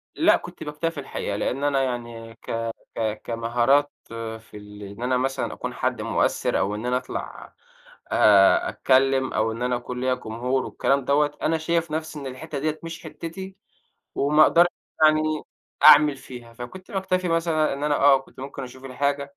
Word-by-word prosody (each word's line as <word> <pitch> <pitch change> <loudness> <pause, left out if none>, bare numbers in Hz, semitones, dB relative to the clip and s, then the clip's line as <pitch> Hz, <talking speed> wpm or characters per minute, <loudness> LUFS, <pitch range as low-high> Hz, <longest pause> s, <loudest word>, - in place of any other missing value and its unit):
لأ، - - +4
كنت - - -10
باكتفي 150 +1 -3
الحقيقة 100 -6 -4
لإن 135 +6 -2
أنا 140 -2 +2
يعني 120 -2 -5
ك 115 0 -4 0.2
ك 110 -1 -2
كمهارات 120 +5 +1 0.5
في 115 - -23
ال 105 0 -11
إن 100 +4 -8
أنا 125 0 +1
مثلًا 135 +1 -2
أكون - - -5
حد - - -2
مؤثِّر - - 0
أو 100 +2 0
إن 110 +3 -6
أنا 125 0 +1
أطلع - - -7 0.6
أ 355 0 +5
أتكلّم 135 - +2
أو 110 +1 +1
إن 115 +2 -7
أنا 125 0 +1
أكون 125 +1 -5
ليّا 130 0 +2
جمهور 125 +2 -2
والكلام 140 -1 0
دوّة، 145 +1 +2
أنا 165 +1 +1
شايف 165 0 -1
نَفْسي 155 -1 -4
إن 140 - -6
الحتّة 140 +3 -6
ديّة 155 +1 -2
مش 165 0 -7
حتّتي، 190 +3 -8 0.6
وما 150 +2 +4
أقدرش 175 +2 +6 0.4
يعني 155 0 +3 0.5
أعمل 145 -1 +7
فيها، 120 -3 -11
فكنت 120 +11 -10
باكتفي 185 -2 -1
مثلًا 165 -2 +1
إن 140 +2 -4
أنا 150 -1 +2
آه، 140 -1 +6
كنت 135 - -16
ممكن 135 0 -7
أشوف 130 +1 -10
الحاجة 140 +2 -2
135 Hz, 170 wpm, -24 LUFS, 120-155 Hz, 0.6 s, أعمل